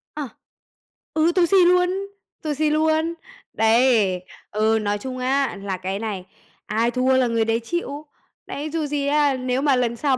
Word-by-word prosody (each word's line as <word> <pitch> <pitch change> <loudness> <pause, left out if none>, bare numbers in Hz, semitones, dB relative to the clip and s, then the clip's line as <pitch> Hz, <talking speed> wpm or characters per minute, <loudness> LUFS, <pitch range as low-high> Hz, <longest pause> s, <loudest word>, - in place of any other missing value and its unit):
À. 290 -5 -4 0.8
Ừ, 320 +2 +3
tù 355 -2 +5
xì 390 +3 +3
luôn, 360 0 +4 0.5
tù 300 -1 -1
xì 305 +1 +1
luôn. 315 +2 +1 0.4
Đấy. 225 -5 +3 0.3
Ừ, 220 +1 +2
nói 205 0 -1
chung 255 +4 -6
á, 265 -1 0
là 190 -2 -3
cái 190 +2 -4
này, 205 -4 -4 0.4
ai 225 +3 0
thua 255 +2 +2
là 255 -2 +3
người 230 -1 +1
đấy 225 +1 +1
chịu. 300 0 -4 0.4
Đấy, 295 +2 -5
dù 320 -2 -1
gì 285 -1 -2
á, 290 -2 +2
nếu 255 +1 -1
mà 280 -3 +3
lần 240 -2 0
sau 265 +2 +1
260 Hz, 175 wpm, -22 LUFS, 225-300 Hz, 0.8 s, tù